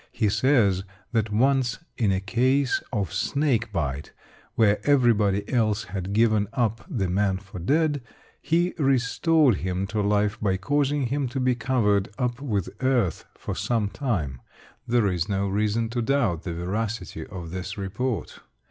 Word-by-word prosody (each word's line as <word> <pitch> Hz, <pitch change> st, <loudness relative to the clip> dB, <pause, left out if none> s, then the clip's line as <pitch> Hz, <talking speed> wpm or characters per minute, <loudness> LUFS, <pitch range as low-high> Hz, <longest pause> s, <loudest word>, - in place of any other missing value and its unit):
He 110 Hz, -3 st, +1 dB
says 105 Hz, -6 st, +3 dB, 0.3 s
that 110 Hz, -2 st, 0 dB
once 125 Hz, +1 st, +2 dB, 0.2 s
in 105 Hz, -5 st, +1 dB
a 95 Hz, -, +1 dB
case 125 Hz, +7 st, +1 dB
of 100 Hz, -8 st, -2 dB
snake 130 Hz, -7 st, 0 dB
bite, 75 Hz, -6 st, -3 dB, 0.4 s
where 105 Hz, -4 st, +4 dB
everybody 110 Hz, -8 st, +3 dB
else 110 Hz, -3 st, +2 dB
had 95 Hz, +1 st, -5 dB
given 110 Hz, -1 st, +3 dB
up 115 Hz, -1 st, 0 dB
the 110 Hz, -, -1 dB
man 95 Hz, +1 st, +1 dB
for 95 Hz, -1 st, -10 dB
dead, 145 Hz, -, +1 dB, 0.4 s
he 175 Hz, +2 st, +1 dB
restored 135 Hz, -, +3 dB
him 95 Hz, +1 st, -2 dB
to 105 Hz, +2 st, -2 dB
life 105 Hz, +1 st, +1 dB
by 95 Hz, -3 st, +1 dB
causing 145 Hz, +7 st, 0 dB
him 135 Hz, +2 st, -1 dB
to 135 Hz, +2 st, -4 dB
be 130 Hz, 0 st, +2 dB
covered 110 Hz, -5 st, +1 dB
up 125 Hz, +1 st, -2 dB
with 105 Hz, -, -1 dB, 0.2 s
earth 120 Hz, -10 st, +1 dB
for -, -, -5 dB
some 115 Hz, -4 st, 0 dB
time. 85 Hz, -, -2 dB, 0.5 s
There 120 Hz, -2 st, +3 dB
is 90 Hz, -1 st, 0 dB
no 100 Hz, 0 st, 0 dB
reason 105 Hz, +3 st, 0 dB
to 120 Hz, +1 st, -2 dB
doubt 115 Hz, -, +1 dB
the 90 Hz, -, -4 dB
veracity 95 Hz, -1 st, -3 dB
of 90 Hz, -4 st, -8 dB
this 95 Hz, +4 st, -5 dB
report. 105 Hz, +4 st, -3 dB
110 Hz, 155 wpm, -25 LUFS, 95-130 Hz, 0.5 s, where